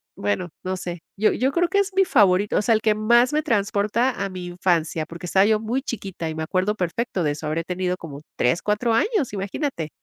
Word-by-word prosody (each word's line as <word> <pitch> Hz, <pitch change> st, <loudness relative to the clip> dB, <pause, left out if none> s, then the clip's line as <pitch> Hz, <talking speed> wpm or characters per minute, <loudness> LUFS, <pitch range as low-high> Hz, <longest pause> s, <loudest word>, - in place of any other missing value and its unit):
bueno 105 Hz, -, -2 dB
no 185 Hz, 0 st, -2 dB
sé. 175 Hz, -2 st, -6 dB, 0.2 s
Yo 215 Hz, -, +4 dB
yo 265 Hz, +2 st, 0 dB
creo 350 Hz, +2 st, +2 dB
que 400 Hz, -, 0 dB
es 400 Hz, 0 st, 0 dB
mi 385 Hz, -, +5 dB
favorito, 205 Hz, -, +3 dB
o -, -, +3 dB
sea, 230 Hz, -, +3 dB
el 220 Hz, -, +2 dB
que 215 Hz, -1 st, +2 dB
más 235 Hz, +4 st, +4 dB
me 305 Hz, 0 st, +1 dB
transporta 215 Hz, 0 st, +1 dB
a 195 Hz, -, -4 dB
mi 185 Hz, -1 st, -7 dB
infancia, 170 Hz, -3 st, 0 dB
porque 170 Hz, +1 st, -9 dB
estaba 190 Hz, +3 st, +4 dB
yo 215 Hz, 0 st, +3 dB
muy 235 Hz, +5 st, -2 dB
chiquita 195 Hz, -, -5 dB
y 160 Hz, -, -5 dB
me 160 Hz, -, -4 dB
acuerdo 185 Hz, +5 st, 0 dB
perfecto 190 Hz, +1 st, -2 dB
de 150 Hz, -, +1 dB
eso. 150 Hz, +1 st, -6 dB
Habré 160 Hz, +2 st, -1 dB
tenido 180 Hz, +1 st, -2 dB
como 150 Hz, -5 st, -9 dB
3, 125 Hz, +8 st, +1 dB
4 215 Hz, +3 st, +1 dB
años, 325 Hz, -, +1 dB
imagínate. 195 Hz, -, -3 dB
200 Hz, 225 wpm, -23 LUFS, 175-235 Hz, 0.2 s, mi